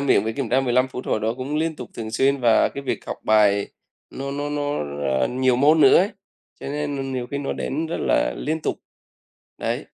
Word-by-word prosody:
miệng 135 -7 +3
với 110 - -1
kiểm 135 -2 -3
tra 130 +4 +3
15 130 0 +2
phút 130 0 -7
hồi 110 - 0
đó 110 +2 -1
cũng 135 +4 -3
liên 160 0 -1
tục 125 -4 -8
thường 110 -2 -5
xuyên, 135 +4 +2
và 115 -2 +4
cái 140 - -7
việc 140 - -3
học - - -4
bài 105 -2 +3 0.4
nó 135 +1 -5
nó 145 +1 -3
nó, 145 0 -2 0.4
ờ, - - +3
nhiều 130 0 +2
môn 150 +4 +4
nữa 135 -3 +7
ấy, 195 +4 +2 0.5
cho - - -7
nên, 145 0 -3
ờ, 135 - -3
nhiều 130 -2 -3
khi 140 - -4
nó 140 - -2
đến 155 +4 -3
rất 165 - -3
là - - +1
liên 160 +2 -2
tục. - - -2 0.8
Đấy. - - -2
135 Hz, 230 wpm, -23 LUFS, 120-145 Hz, 0.8 s, nữa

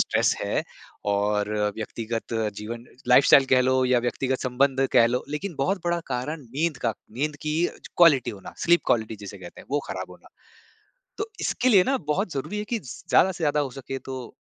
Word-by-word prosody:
Stress - - +2
है - - -1 0.5
और 105 +1 0 0.3
व्यक्तिगत 115 +1 -4 0.2
जीवन 115 +3 -6 0.2
लाइफ़स्टाइल 135 +2 +7
कह 130 - +5
लो 130 0 +2
या 125 -1 +3
व्यक्तिगत 130 +2 -1
संबंध 135 +1 +2
कह 115 - +6
लो 125 +2 -1
लेकिन 165 +6 -4
बहुत 185 +8 0
बड़ा 170 0 0
कारण 135 +5 -3
नींद 140 +6 -2
का 115 - +1 0.2
नींद 145 +6 -2
की 155 0 -1 0.4
क्वालिटी 145 -8 +5
होना, 100 -4 -10
स्लीप 175 0 +4
क्वालिटी 110 -1 +1
जिसे 100 -1 -9
कहते 90 -2 -11
हैं - - -16
वो 145 +1 +1
ख़राब - - -5
होना। - - -15 0.9
तो 425 +1 -2
इसके 255 - +1
लिए 195 -7 +6
ना 270 - +1 0.2
बहुत 190 0 -2
ज़रूरी 145 +10 -3
है 210 - -3
कि - - +1
ज़ 135 - -9 0.2
ज़्यादा 190 - +5
से 170 -2 -4
ज़्यादा 150 0 +2
हो 140 - -2
सके 135 +1 -6
तो 130 -2 -8
135 Hz, 190 wpm, -25 LUFS, 120-155 Hz, 0.9 s, लाइफ़स्टाइल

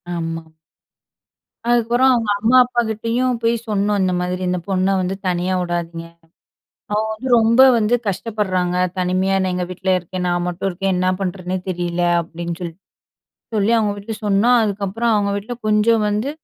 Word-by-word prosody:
ஆமா. 165 -1 -5 1.2
அதுக்கப்புறம் 240 +2 +3
அவங்க 230 -3 0
அம்மா, 230 +4 +4
அப்பா 240 -1 0
கிட்டேயும் 230 +3 -1
போய் 230 +1 +3
சொன்னோம் 205 0 +1
"இந்த 185 -1 +1
மாதிரி 180 +1 -2
இந்த 180 - 0
பொண்ண 185 0 +1
வந்து 185 +1 -2
தனியா 180 +1 0
உடாதீங்க. 170 -1 -4 0.9
அவ 210 - +2
வந்து 220 +5 -6
ரொம்ப 230 +3 +4 0.2
வந்து 225 +2 +2
கஷ்டப்படுறாங்க, 190 -3 -1 0.2
தனிமையா 185 +1 +1
என்ன 185 -1 0
எங்க 180 0 -2
வீட்டுலியே 185 +1 0
இருக்கேன், 180 +1 -5
நான் 175 0 0
மட்டும் 180 +2 -3
இருக்கேன், 195 +1 -1
என்ன 185 +1 +1
பண்ணுறதுன்னே 185 0 -3
தெரியல" 175 -1 -2 0.2
அப்டீன்னு 170 0 -6
சொல்லிட்டு 175 +1 -7 0.7
சொல்லி 210 +1 +2
அவங்க 215 -2 +1
வீட்டில 205 +2 -6
சொன்னோ. 205 +4 +3
அதுக்கப்புறம் 210 +3 -1
அவங்க 205 -1 +1
வீட்டில 210 +5 -4
கொஞ்சம் 215 +1 +3
வந்து 210 +6 -1
195 Hz, 155 wpm, -19 LUFS, 180-220 Hz, 1.2 s, அம்மா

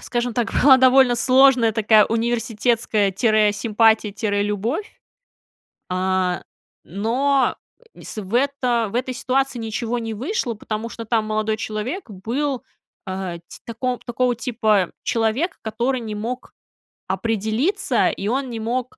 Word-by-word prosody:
скажем 240 -1 -2
так, 230 -1 0
была 270 -1 +8
довольно 260 -1 +5
сложная 255 -1 +4
такая 215 -1 +5
университетская 230 -2 0
тире 215 +1 +3
симпатия, 220 -1 +2
тире 205 -1 -1
любовь, 220 - -3 0.9
э, 185 -1 0 0.4
но 250 - +1 0.4
и - - -15
с - - -9
в 195 +2 -10
это 250 -4 +1
в - - -6
этой 255 +1 -1
ситуации 260 0 -1
ничего 230 +2 -3
не 225 -1 -4
вышло, 260 - -2
потому 220 +1 -5
что 230 -1 -8
там 220 -1 +1
молодой 215 0 -1
человек 225 - -4
был, 245 +7 -3 0.4
э, 185 -2 -4
ти - - -12
тако 245 +2 -3
такого 245 +1 0
типа 220 -5 +1
человек, 235 +10 0
который 240 +4 -1
не 215 -2 -5
мог 235 +4 -5 0.5
определиться, 225 - 0
и 195 - -4
он 265 +2 -1
не 230 - -5
мог, 245 +2 -3
230 Hz, 135 wpm, -21 LUFS, 215-255 Hz, 0.9 s, была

